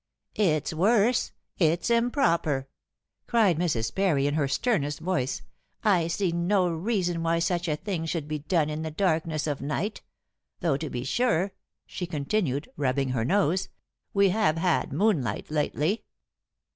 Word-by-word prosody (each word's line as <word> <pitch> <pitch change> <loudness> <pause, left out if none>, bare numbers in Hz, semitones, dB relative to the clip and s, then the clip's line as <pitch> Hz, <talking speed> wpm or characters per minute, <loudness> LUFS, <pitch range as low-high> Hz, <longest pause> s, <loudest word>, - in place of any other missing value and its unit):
"It's 160 -7 +1
worse; 215 +7 +3 0.3
it's 170 +6 +2
improper," 170 - +2 0.6
cried 210 -9 +3
Mrs. 135 -11 0
Parry 175 -8 +2
in 145 - +1
her 150 -2 +1
sternest 145 - 0
voice. 160 -8 -1 0.4
"I 185 -7 +3
see 175 +2 0
no 180 +2 +2
reason 175 0 -1
why 165 0 +1
such 175 +1 0
a 155 - +1
thing 170 -1 -3
should 160 -3 -2
be 155 0 -3
done 155 0 0
in 155 +1 -3
the 160 - -3
darkness 160 -2 0
of 145 -3 -2
night. 150 +10 -2 0.6
Though 165 -6 +1
to 155 +1 -5
be 120 - -4
sure," 195 - +1 0.3
she 180 - -5
continued, 150 -2 -1
rubbing 135 -1 0
her 125 -3 0
nose, 185 - +1 0.4
"we 200 -1 +4
have 190 -5 +2
had 170 0 +1
moonlight 150 - 0
lately." 155 +6 0
165 Hz, 145 wpm, -27 LUFS, 150-195 Hz, 0.6 s, we